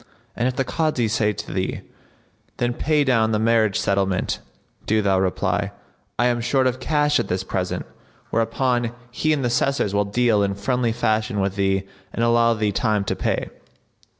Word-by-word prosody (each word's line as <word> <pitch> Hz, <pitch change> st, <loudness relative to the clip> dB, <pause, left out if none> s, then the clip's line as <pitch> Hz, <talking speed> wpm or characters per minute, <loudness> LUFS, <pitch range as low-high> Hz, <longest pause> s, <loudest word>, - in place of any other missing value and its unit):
And 120 Hz, -, 0 dB
if 130 Hz, -, -2 dB
the 135 Hz, -, +1 dB
Kazi 140 Hz, -4 st, 0 dB
say 105 Hz, -1 st, +1 dB
to 100 Hz, -, -7 dB
thee, 95 Hz, +1 st, -2 dB, 0.8 s
'Then 120 Hz, 0 st, 0 dB
pay 150 Hz, +3 st, +1 dB
down 115 Hz, -5 st, +2 dB
the -, -, +3 dB
marriage 110 Hz, -2 st, +2 dB
settlement,' 95 Hz, -1 st, 0 dB, 0.5 s
do 110 Hz, +1 st, +3 dB
thou 95 Hz, -2 st, +3 dB
reply, 95 Hz, +1 st, 0 dB, 0.4 s
'I 120 Hz, -, +2 dB
am 120 Hz, -1 st, +1 dB
short 130 Hz, +3 st, +1 dB
of 130 Hz, 0 st, 0 dB
cash 150 Hz, -2 st, +2 dB
at 120 Hz, -, -1 dB
this 90 Hz, +1 st, -1 dB
present;' 95 Hz, -1 st, -3 dB, 0.5 s
whereupon 120 Hz, +1 st, 0 dB, 0.2 s
he 155 Hz, +5 st, 0 dB
and 145 Hz, -3 st, +1 dB
the -, -, +1 dB
Assessors 120 Hz, -3 st, +1 dB
will 100 Hz, 0 st, +2 dB
deal 110 Hz, 0 st, +2 dB
in 100 Hz, -1 st, 0 dB
friendly 120 Hz, +3 st, 0 dB
fashion 110 Hz, -2 st, 0 dB
with 95 Hz, 0 st, 0 dB
thee 95 Hz, -1 st, +1 dB, 0.3 s
and 115 Hz, -, -1 dB
allow 115 Hz, 0 st, +4 dB
thee 105 Hz, -1 st, 0 dB
time 105 Hz, -1 st, +1 dB
to 100 Hz, -, -2 dB
pay." -, -, -2 dB
115 Hz, 180 wpm, -22 LUFS, 100-125 Hz, 0.8 s, allow